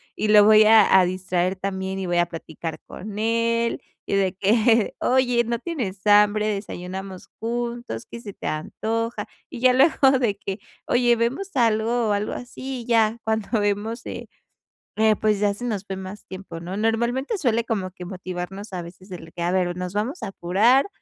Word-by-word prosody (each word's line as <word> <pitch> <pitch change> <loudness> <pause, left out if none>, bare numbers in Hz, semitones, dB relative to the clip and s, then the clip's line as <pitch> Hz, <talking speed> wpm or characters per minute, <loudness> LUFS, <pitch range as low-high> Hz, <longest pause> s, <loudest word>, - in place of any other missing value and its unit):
y 215 - -1
lo 210 -1 +7
voy 215 0 +7
a 220 -3 +7
a 185 - +4
distraer 185 0 -1
también, 190 0 -3
y 190 - -3
voy 175 0 0
a 175 - +2
platicar 165 -1 -7
con 205 +1 -8
él, 230 +1 0 0.2
y - - -1
de 195 -2 +1
que: 225 +3 +3
"Oye, 250 -2 +2
¿no 235 0 -2
tienes 225 - -5
hambre? 210 +1 +5
¿Desayunamos 190 -2 -5
juntos? 235 - -4
¿Qué 235 - -8
se 210 - -7
te - - -7
antoja?". 225 +9 -3 0.2
Y - - -8
ya 255 0 +5
luego 270 0 +5
de 215 -5 0
que: 195 0 -5 0.3
"Oye, 245 0 +3
¿vemos 265 - -1
algo?". 230 -1 +2
O - - +3
algo 205 +1 -1
así, 255 +1 -6
y - - -11
ya 225 -1 +3
cuando 220 0 0
vemos, 205 +3 -2
eh, - - -7 0.7
eh, 220 0 +4
pues, 215 -2 +1
ya 205 -1 +2
se 205 - -9
nos 210 -5 -3
fue 195 - -5
más 190 +2 -8
tiempo, 185 -3 -8
¿no? 180 +3 -5
Normalmente, 235 - 0
suele 235 - +1
como 195 -5 -2
que 180 - -10
motivarnos, 185 +2 -6
a 180 - -3
veces, 180 +3 -13
el 165 -2 -9
que: 175 - -7
"A 175 - +1
ver, 180 -1 0
nos 180 0 -4
vamos 225 - -2
a - - -2
apurar 205 - +3
210 Hz, 190 wpm, -23 LUFS, 190-235 Hz, 0.7 s, lo